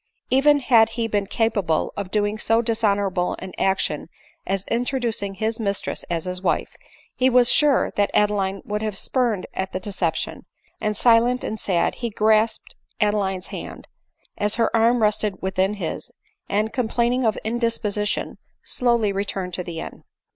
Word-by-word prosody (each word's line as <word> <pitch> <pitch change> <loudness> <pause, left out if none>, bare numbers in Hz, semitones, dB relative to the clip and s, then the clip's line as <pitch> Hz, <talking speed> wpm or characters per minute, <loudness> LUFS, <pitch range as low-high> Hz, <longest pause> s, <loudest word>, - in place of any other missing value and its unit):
Even 285 +2 +4
had 230 -3 +5
he 230 -1 0
been 205 -2 -1
capable 200 -8 0
of 200 -2 -4
doing 210 +1 0
so 225 +2 +2
dishonorable 200 -5 +1
an 190 -1 -8
action 180 -5 0 0.4
as 195 0 -1
introducing 235 -5 -1
his 220 +3 -2
mistress 200 -3 -2
as 170 -1 -2
his 180 0 -4
wife, - - 0 0.5
he 260 0 +3
was 245 -1 +4
sure 290 -2 +3
that 205 -1 +2
Adeline 200 -2 +1
would 210 0 -3
have 215 -3 -3
spurned 235 -7 0
at 190 0 -4
the 185 - -2
deception; 185 -5 -2 0.3
and 210 -1 -1
silent 240 +2 +4
and 220 - -4
sad 175 -3 +1
he 235 - -4
grasped 220 +1 +1 0.2
Adeline's 200 -3 0
hand, - - -8 0.5
as 205 0 +1
her 230 0 +1
arm 230 +1 +3
rested 210 -1 +1
within 190 +2 0
his, 180 -6 -5 0.4
and, 215 +2 0
complaining 245 +1 0
of 220 -2 +1
indisposition, 220 -3 -1 0.2
slowly 235 -4 +1
returned 195 -2 -3
to 180 - -3
the 170 -2 -6
inn. - - -9
210 Hz, 155 wpm, -23 LUFS, 195-230 Hz, 0.5 s, had